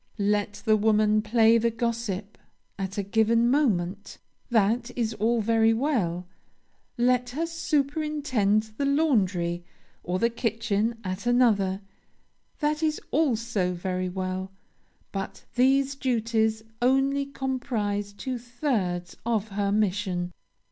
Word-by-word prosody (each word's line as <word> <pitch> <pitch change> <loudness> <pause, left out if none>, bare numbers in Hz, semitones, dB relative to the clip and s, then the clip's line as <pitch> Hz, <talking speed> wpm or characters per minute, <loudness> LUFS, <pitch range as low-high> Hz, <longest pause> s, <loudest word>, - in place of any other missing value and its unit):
Let 205 0 0
the 215 -1 +5
woman 215 0 +3
play 225 +1 +4
the 230 +1 +2
gossip 225 -3 -3 0.4
at 195 0 -4
a 200 - 0
given 230 +3 +3
moment, 200 -9 0 0.3
that 230 +1 +2
is 230 -2 0
all 225 +2 +1
very 225 +1 +3
well; 210 - 0 0.7
let 250 0 +2
her 305 +7 -2
superintend 290 -9 0
the 280 - 0
laundry 195 - +1 0.4
or 180 +1 -1
the 235 +4 +1
kitchen 225 -1 -1
at 185 +4 -4
another, 210 -6 +3 0.8
that 300 +1 +1
is 310 -1 +1
also 230 - +1
very 185 +1 -2
well; 185 +1 -4 0.6
but 195 -1 -5
these 270 +3 +3
duties 225 -4 0 0.2
only 270 +2 +2
comprise 230 -7 -2
two 250 +4 -5
thirds 230 -8 -2
of 220 -2 -1
her 200 0 -1
mission. 190 -4 0
225 Hz, 115 wpm, -26 LUFS, 200-250 Hz, 0.8 s, the